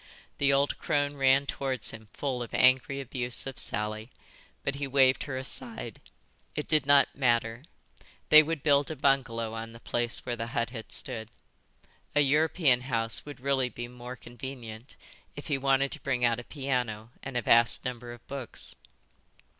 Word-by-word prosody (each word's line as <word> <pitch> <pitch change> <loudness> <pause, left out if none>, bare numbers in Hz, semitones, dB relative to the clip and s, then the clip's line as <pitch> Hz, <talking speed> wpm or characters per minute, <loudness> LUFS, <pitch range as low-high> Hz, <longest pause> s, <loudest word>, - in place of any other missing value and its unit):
The 140 0 +4
old 140 +1 +1
crone 145 -1 0
ran 135 0 +4
towards 135 -4 -3
him 110 -1 -11
full 130 -3 -3
of 120 - -5
angry 130 +1 +4
abuse 125 -2 -2
of 135 -3 -6
Sally, 110 +2 0 0.5
but 140 - -1
he 140 -1 -3
waved 135 -1 +4
her 135 -3 -4
aside; 130 - -4 0.5
it 150 - -3
did 155 -3 +2
not 145 -1 +5
matter; 120 -1 +1 0.6
they 155 - +10
would 155 -2 -3
build 140 -2 +3
a 160 - -4
bungalow 130 -5 +1
on 115 0 -6
the 115 - -12
place 120 0 -1
where 120 -1 -2
the 115 0 -4
hut 115 0 0
had 115 -3 -8
stood. 110 -4 -4 0.9
A 150 - +5
European 150 -2 +3
house 115 -1 -1
would 145 -1 -8
really 135 -1 +1
be 120 0 -6
more 125 +1 -9
convenient 120 -1 -9 0.4
if 145 - -8
he 145 - +1
wanted 135 0 +2
to 155 - -6
bring 125 -3 0
out 115 0 +2
a - - -7
piano 125 -6 -3
and 135 -2 -5
a 120 - -1
vast 115 0 +4
number 120 -1 -5
of 120 -1 -12
books. 135 -4 -6
130 Hz, 170 wpm, -29 LUFS, 120-140 Hz, 0.9 s, they